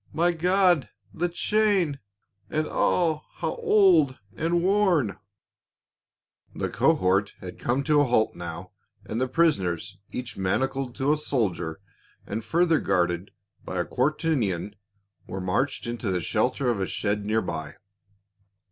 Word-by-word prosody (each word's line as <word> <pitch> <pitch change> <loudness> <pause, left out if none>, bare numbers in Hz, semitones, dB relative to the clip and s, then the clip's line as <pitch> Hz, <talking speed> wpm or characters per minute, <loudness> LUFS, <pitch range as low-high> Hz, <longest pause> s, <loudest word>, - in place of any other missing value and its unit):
— - - -24
My 175 +1 +5
God, 180 -1 +2 0.2
the 175 +2 -1
chain! 190 -5 +1 0.5
And 155 0 0
ah, 160 -4 +1
how - - -2
old 395 - +4 0.2
and 170 +2 0
worn 185 - +2 0.7
!" - - -38
The - - -2
cohort 95 +2 +2
had 90 -1 -9
come 130 +3 0
to 150 0 +4
a - - +3
halt 120 -3 +2
now 85 +1 -7 0.3
and 115 +3 -3
the 130 - +1
prison 150 - +2
ers, 90 +4 -5
each 125 -1 -5
manacled 130 +7 -1
to 140 +2 +2
a - - 0
soldier 100 - -1 0.5
and 110 +2 -4
further 165 +3 +2
guarded 90 +1 0 0.3
by 95 - -5
a 90 - 0
quaternion, 125 - 0 0.5
were 95 - -5
marched 100 +10 -1
into 120 -2 -3
the 90 -1 0
shelter 125 - 0
of 110 - -2
a 95 - -1
shed 105 0 -1
near 110 +2 0
by. 80 -3 -5
130 Hz, 145 wpm, -26 LUFS, 95-165 Hz, 0.7 s, My